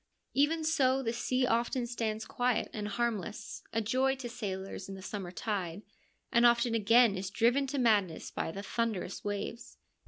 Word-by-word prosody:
A - - 0
Even 315 +3 +3
so 270 -4 +2
the 230 -1 -1
sea 255 +2 +1
often 240 +1 +1
stands 220 -2 -2
quiet 245 -1 0
and 210 -1 -3
harmless, 215 -1 -3
a 225 - 0
joy 260 +5 +2
to 260 -2 -6
sailors 195 -5 -5
in 195 - -5
the 190 - -9
summer 195 -3 -5
tide, 190 -2 -3 0.5
and 235 - +4
often 235 0 +4
again 230 0 +5
is 190 0 -3
driven 240 +7 +2
to 280 - -3
madness 210 -9 +2
by - - -2
the 200 +4 -6
thunderous 220 -4 -2
waves. 205 +3 -4
230 Hz, 175 wpm, -31 LUFS, 205-250 Hz, 0.5 s, again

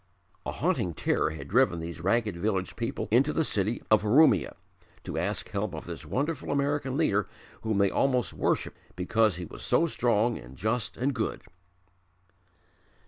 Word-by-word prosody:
A - - -1
haunting 85 -3 0
terror 80 - +1
had 75 -3 -7
driven 115 - +3
these 85 0 -6
ragged 105 +1 +1
village 95 0 -1
people 115 0 -3
into 135 +6 +4
the 160 - +1
city 105 -3 0
of 110 - +6
Urumia, 105 - +4 0.5
to - - -4
ask - - -2
help - - -3
of - - -7
this - - -7
wonderful 145 +3 -2
American 140 -1 0
leader 105 - +1 0.3
whom 110 -2 -1
they 100 -1 +3
almost 130 -3 +1
worshipped - - -1 0.2
because 105 +2 +2
he 90 0 -5
was - - -10
so 170 - +3
strong 120 -6 +1
and 65 +2 -13
just 110 +2 -1
and 135 +3 0
good. 115 -3 -3
110 Hz, 160 wpm, -28 LUFS, 95-130 Hz, 0.5 s, of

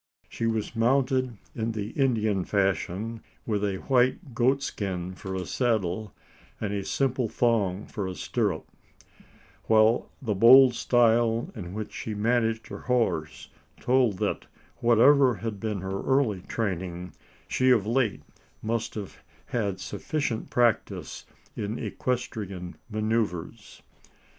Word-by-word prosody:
She 115 - -3
was 110 0 -2
mounted 130 0 +1 0.2
in 115 0 -2
the 105 -1 -4
Indian 110 -8 +1
fashion, 100 +3 -1 0.2
with 105 -2 -1
a 100 -2 0
white 130 +2 +2
goatskin 105 -8 -1
for 95 0 -6
a 95 -1 -3
saddle, 110 -5 -1 0.5
and 105 -1 -2
a 100 -1 -2
simple 130 0 0
thong 105 -6 +1
for 100 -5 -4
a 95 - -5
stirrup; 100 -8 -1 1.0
while 110 +1 +4
the 115 -5 -1
bold 125 +5 +8
style 115 -1 +2
in 90 -4 -7
which 110 -1 -5
she 110 - -5
managed 115 +1 +1
her - - -7
horse, 115 -11 -1 0.3
told 125 -6 +2
that, - - -2 0.3
whatever 125 +2 +5
had 105 +1 -5
been 105 -2 -3
her 95 +1 -3
early 130 -8 +1
training, 90 -5 -3 0.3
she 130 0 +2
of 115 -6 +4
late 115 -2 0 0.4
must 115 +1 -2
have 105 -3 -7 0.3
had 100 -6 -2
sufficient 140 - -3
practice 120 -3 0 0.3
in 105 +3 -3
equestrian 100 -8 -4
manoeuvres. 110 -5 -2
110 Hz, 125 wpm, -27 LUFS, 100-120 Hz, 1.0 s, bold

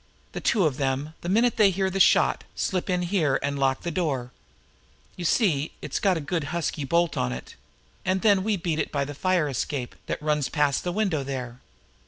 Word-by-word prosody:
The - - -5
two 205 - +2
of 145 -5 0
them, 135 +2 -1
the 175 - -4
minute 230 +5 +3
they 210 -3 +6
hear 190 0 0
the 195 - -2
shot, - - +4
slip 185 0 -1
in 180 -1 +1
here, 170 -7 +1
and 140 0 -1
lock 135 -1 +1
the 170 - -3
door 140 -8 -2 0.8
you 180 - -6
see 160 - +2
it's - - -3
got 190 -4 +2
a - - -2
good, 160 +1 -2
husky 160 -1 -2
bolt 170 +2 +1
on 60 - 0
it 60 0 -7 0.5
and 185 0 0
then 200 -3 +4
we 210 -1 +1
beat 165 -3 -2
it - - -1
by 140 -1 0
the 145 - -6
fire 180 +1 +1
escape 135 0 -3
that - - -2
runs 150 -2 0
past 145 -3 +1
that 175 - -1
window 190 -8 0
there. 125 -3 -5
160 Hz, 210 wpm, -26 LUFS, 140-185 Hz, 0.8 s, they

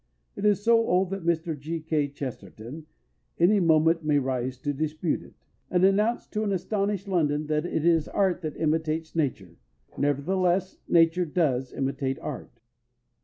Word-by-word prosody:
It 205 - -4
is 205 -1 +3
so 230 0 +5
old 185 +1 +2
that 195 -3 -4
Mr. 165 -1 0
G. 155 +4 -5
K. 155 -2 0
Chesterton 140 +1 -8 0.5
any 195 +5 +4
moment 165 -1 +3
may 150 -1 +2
rise 130 -2 -1
to 145 - -1
dispute 155 +3 -2
it, - - -16 0.3
and 180 +1 +3
announce 210 +5 +2
to 215 - -2
an 205 - -1
astonished 200 +1 -1
London 155 -5 +1
that 150 +2 -1
it 160 -2 -1
is 165 -3 +3
Art 190 -3 0
that 155 -3 -5
imitates 160 0 -1
Nature; 105 - -2 0.4
nevertheless, 180 +6 0
Nature 170 +1 +4
does 140 -6 0
imitate 135 0 -2
Art. - - -6
160 Hz, 155 wpm, -26 LUFS, 145-185 Hz, 0.5 s, so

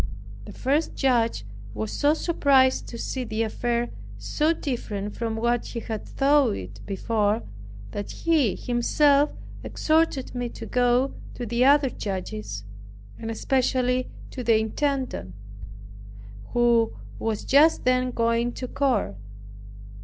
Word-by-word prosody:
The - - -9
first 290 +5 0
judge 230 - +1 0.3
was 105 0 -3
so 295 +2 +2
surprised 275 -6 +3
to 235 - -7
see 255 +2 -3
the 225 -1 -1
affair 240 +2 -1 0.3
so 305 +2 0
different 210 -9 -3
from 225 -2 -2
what 235 +1 +1
he 235 - -5
had 220 -2 -5
thought 280 - +3
it 95 +1 -8
before, 210 +2 0 0.5
that 205 - -5
he 305 - +1
himself 280 +4 +3 0.3
exhorted 310 -4 +1
me 245 -1 -3
to - - -8
go 250 +2 +2 0.2
to 245 - -4
the 235 +3 +2
other 280 -1 +5
judges, 195 - -5 0.6
and 225 - -5
especially 255 +1 +1 0.2
to 255 - -5
the 230 -1 +4
intendant, 255 - -2 1.2
who 235 -2 +3 0.3
was 220 -2 -2
just 295 +3 +5
then 255 0 +3
going 230 0 +1
to 255 - -5
court. 245 - 0
240 Hz, 125 wpm, -25 LUFS, 225-270 Hz, 1.2 s, other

